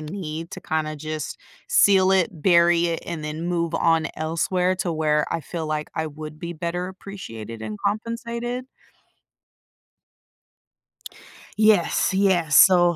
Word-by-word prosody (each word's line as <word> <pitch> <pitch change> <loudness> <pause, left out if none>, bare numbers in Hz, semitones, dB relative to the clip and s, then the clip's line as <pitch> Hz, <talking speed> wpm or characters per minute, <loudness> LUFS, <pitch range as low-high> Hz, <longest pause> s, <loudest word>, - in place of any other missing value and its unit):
need 160 0 -6
to 185 - -7
kinda 155 -2 -2
just 155 0 -5 0.3
seal 190 -2 +5
it, 190 -3 +3
bury 170 -1 +4
it, 165 - -1
and 170 -3 -5
then 155 +3 -4
move 170 -1 -1
on 165 -1 +2
elsewhere, 180 +4 0
to 175 -2 -2
where 150 -1 +1
I 165 - 0
feel 160 +2 -5
like 155 0 -2
I 160 0 -2
would 155 +1 -9
be 170 0 -5
better 175 +2 -3
appreciated 115 - -9
and 105 -1 -6
compensated 235 +3 -3 3.0
Yes, 210 -3 +3
yes, 180 -7 +2
so, 175 -2 +7
170 Hz, 130 wpm, -23 LUFS, 155-185 Hz, 3.0 s, so